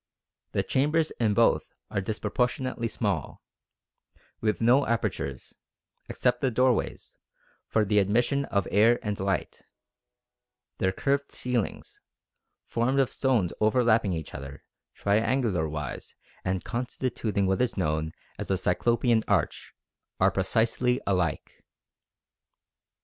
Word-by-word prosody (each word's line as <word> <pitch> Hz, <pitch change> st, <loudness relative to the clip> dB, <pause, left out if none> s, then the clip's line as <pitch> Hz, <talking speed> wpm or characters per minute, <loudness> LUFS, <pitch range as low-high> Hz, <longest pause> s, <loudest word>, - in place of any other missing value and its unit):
The -, -, +1 dB
chambers 150 Hz, +4 st, +1 dB
in 110 Hz, -3 st, +2 dB
both 115 Hz, -, +2 dB, 0.2 s
are 100 Hz, -, 0 dB
disproportionately 120 Hz, +4 st, -1 dB
small, -, -, -3 dB, 1.0 s
with 110 Hz, -1 st, 0 dB
no 125 Hz, +5 st, +4 dB
apertures, 70 Hz, -, -3 dB, 0.5 s
except 125 Hz, -1 st, 0 dB
the 135 Hz, -, +2 dB
doorways, 125 Hz, 0 st, 0 dB, 0.5 s
for 110 Hz, -1 st, +2 dB
the 105 Hz, +1 st, +3 dB
admission 120 Hz, +8 st, +2 dB
of 100 Hz, -6 st, -1 dB
air 115 Hz, +4 st, +5 dB
and 105 Hz, -1 st, -3 dB
light; 95 Hz, -2 st, -2 dB, 1.2 s
their 95 Hz, -, +2 dB
curved 140 Hz, +7 st, -1 dB
ceilings, 125 Hz, -5 st, -3 dB, 0.6 s
formed 130 Hz, +4 st, 0 dB
of 135 Hz, -, +2 dB
stones 120 Hz, -10 st, +1 dB
overlapping 110 Hz, -2 st, +3 dB
each 80 Hz, -3 st, -5 dB
other, 70 Hz, 0 st, -8 dB, 0.3 s
triangular 105 Hz, -, +1 dB
wise 75 Hz, -4 st, -6 dB, 0.3 s
and 95 Hz, 0 st, -1 dB
constituting 120 Hz, -4 st, -2 dB
what 95 Hz, +4 st, +1 dB
is 125 Hz, -4 st, 0 dB
known 80 Hz, -3 st, 0 dB, 0.3 s
as -, -, -4 dB
the -, -, +1 dB
cyclopean 120 Hz, -1 st, +2 dB
arch, -, -, 0 dB, 0.5 s
are -, -, +4 dB
precisely 115 Hz, +5 st, +1 dB
alike." 90 Hz, -6 st, -1 dB
110 Hz, 110 wpm, -27 LUFS, 95-125 Hz, 1.2 s, air